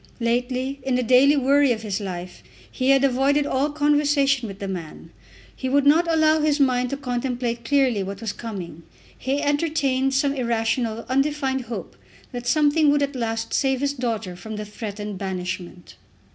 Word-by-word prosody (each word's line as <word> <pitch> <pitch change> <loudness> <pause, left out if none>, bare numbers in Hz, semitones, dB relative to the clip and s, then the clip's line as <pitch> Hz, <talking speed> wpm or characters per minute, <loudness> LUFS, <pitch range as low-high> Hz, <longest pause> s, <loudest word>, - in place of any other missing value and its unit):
Lately, 250 +3 -1
in 260 -1 -1
the 250 - +1
daily 260 +5 +5
worry 280 0 +4
of 220 -2 -2
his 205 -2 -2
life, 180 -2 -6 0.3
he 260 0 -1
had 275 0 +5
avoided 275 +2 +2
all 280 +1 0
conversation 290 -3 +2
with 195 -2 -8
the 200 - -5
man. 175 -5 -7 0.4
He 260 - -3
would 280 +1 +2
not 330 +4 +4
allow 315 -1 +4
his 300 -1 +1
mind 250 -2 +2
to 275 - -3
contemplate 245 -2 -3
clearly 255 -4 +2
what 195 +1 -5
was 220 -3 -4
coming. 195 -8 -7 0.3
He 275 +2 -2
entertained 285 -3 +1
some 275 +1 +2
irrational, 230 -2 -1
undefined 270 -1 0
hope 230 0 -7 0.4
that 245 -1 -6
something 300 +2 +3
would 290 0 +3
at 280 0 -3
last 225 -2 -3
save 265 -2 +1
his 285 0 0
daughter 225 -8 -3
from 220 +4 -8
the 210 0 -5
threatened 210 -1 -6
banishment. 180 -2 -5
255 Hz, 170 wpm, -23 LUFS, 225-280 Hz, 0.4 s, daily